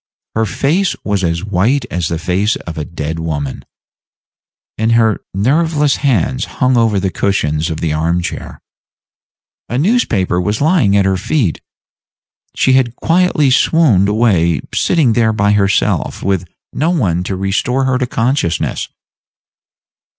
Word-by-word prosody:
Her 110 0 0
face 160 - 0
was 100 -2 -1
as 85 +1 -1
white 110 +8 +1
as 90 -2 -1
the 85 - -2
face 95 +5 0
of 85 - -8
a 75 - -4
dead 80 0 -5
woman, 75 -4 -4 1.1
and 110 +2 +1
her 110 -2 +2
nerveless 145 - +1
hands 130 - 0
hung 130 -1 +2
over 115 -4 +2
the 95 0 -1
cushions 80 -6 -1
of 80 -1 -5
the 80 -2 -1
arm 85 +3 0
chair. 85 - -6 1.1
A 120 - -2
newspaper 125 - +1
was 105 +4 -1
lying 145 - +3
at 100 - +2
her 95 -1 +1
feet. 100 - -1 0.9
She 130 - +2
had 125 -3 +2
quietly 165 -4 +2
swooned 125 - +3
away 100 -7 +2
sitting 150 -10 +2
there 110 -1 +2
by 105 -1 +1
herself, 100 -1 0
with 95 -2 0 0.3
no 155 +4 0
one 100 - 0
by 90 - -6
to 95 - -2
restore 100 +8 -1
her 130 -1 +1
to 125 - -1
consciousness. 115 - -1
105 Hz, 145 wpm, -15 LUFS, 90-130 Hz, 1.1 s, lying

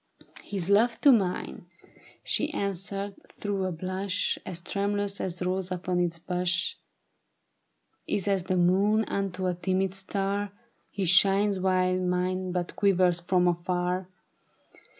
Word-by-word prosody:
" - - -24
' - - -14
His 190 -4 0
love 220 +4 +3
to 285 - +7
mine,' 185 -5 0 0.6
she 300 - 0
answered 200 +1 -2 0.3
through 200 -2 -1
a 185 - -1
blush 185 +3 -2
As 180 -2 -4
tremulous 200 +2 -2
as 180 -1 -3
rose 185 0 -2
upon 180 0 -1
its 170 -1 0
bush, 180 +1 0 0.7
' - - -46
Is 200 - -2
as 195 -3 +1
the 185 0 0
moon 200 +5 +3
unto 190 -2 -2
a 180 - +1
timid 185 +1 -1
star; 195 +1 -2 0.4
His 195 -2 -2
shines, 195 +1 +4
while 185 0 +2
mine 185 0 -1
but 175 -1 -3
quivers 180 -3 +3
from 180 +1 +2
afar. 180 +1 -1
185 Hz, 140 wpm, -27 LUFS, 180-200 Hz, 0.7 s, to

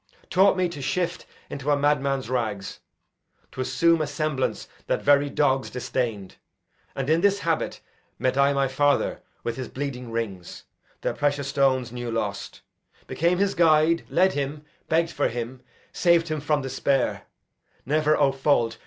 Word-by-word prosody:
taught 190 +1 +4
me 185 -1 +2
to 165 -5 -8
shift 175 +5 -2 0.2
Into 140 +1 -5
a 145 - +4
madman's 140 -2 +1
rags, 110 -6 -3 0.7
t' 130 - -5
assume 165 +5 +2
a 155 - -1
semblance 145 -2 -2 0.2
That - - -1
very 145 0 +4
dogs 135 -2 +1
disdain'd; 115 -6 -3 0.6
and 135 -1 -3
in 160 +2 +3
this 200 +1 +3
habit 165 -1 -1 0.4
Met 130 0 0
I 140 +1 +4
my 140 -1 +1
father 145 +2 +1 0.2
with 120 +1 -3
his 130 - -4
bleeding 130 -3 -5
rings, 105 -6 -5 0.4
Their - - -1
precious 145 -1 -1
stones 130 -3 +1
new 120 -1 -5
lost; 105 -3 -4 0.4
became 170 +2 +1
his 200 +1 +1
guide, 165 0 +4
Led 190 +1 +3
him, 145 +1 -4 0.2
begg'd 165 +1 +2
for 145 - 0
him, 120 +2 -5 0.3
sav'd 170 -1 +3
him 155 -1 -2
from 150 -1 0
despair; 135 0 -1 0.6
Never 155 +2 +2
(O 140 -2 +3
fault!) 135 -4 +1
140 Hz, 155 wpm, -25 LUFS, 130-155 Hz, 0.7 s, taught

